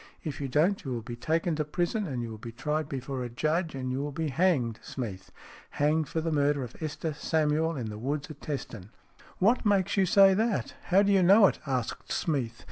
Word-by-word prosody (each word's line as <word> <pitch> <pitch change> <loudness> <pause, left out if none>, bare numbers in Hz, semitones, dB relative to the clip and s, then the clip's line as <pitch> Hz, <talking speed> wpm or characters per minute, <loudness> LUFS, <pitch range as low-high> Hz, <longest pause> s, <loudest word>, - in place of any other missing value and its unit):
If 150 -3 -5
you 140 - -2
don't 170 +10 +2
you 135 - -5
will 120 -2 -3
be 120 +1 -6
taken 160 +6 0
to 155 - +1
prison, 175 +7 -1
and 125 -5 -3
you 115 - -5
will 110 - -8
be 115 +1 -7
tried 150 +5 -2
before 130 -1 -4
a 120 - -4
judge, 155 +6 -1
and 130 -1 -3
you 130 - -2
will 145 +1 -3
be 160 +1 -2
hanged, 135 -8 +1
Smeath. 100 -7 -6 0.5
Hanged 150 +1 +2
for 160 - -1
the 165 0 -2
murder 145 -2 +2
of 125 - -8
Esther 155 +1 -3
Samuel 155 +1 0
in 115 -4 -4
the 105 - -7
woods 140 +4 -2
at 145 - -12
Teston." 125 -9 -5
VI - - -18 0.5
"WHAT 225 +7 +3
makes 200 -1 +2
you 190 -1 +4
say 195 0 +7
that? 220 +2 0
How 195 +3 +4
do 205 - +2
you 195 -1 +5
know 200 +4 +7
it?" - - +2
asked 130 -4 -3
Smeath. 125 -8 -1
150 Hz, 225 wpm, -28 LUFS, 130-170 Hz, 0.5 s, say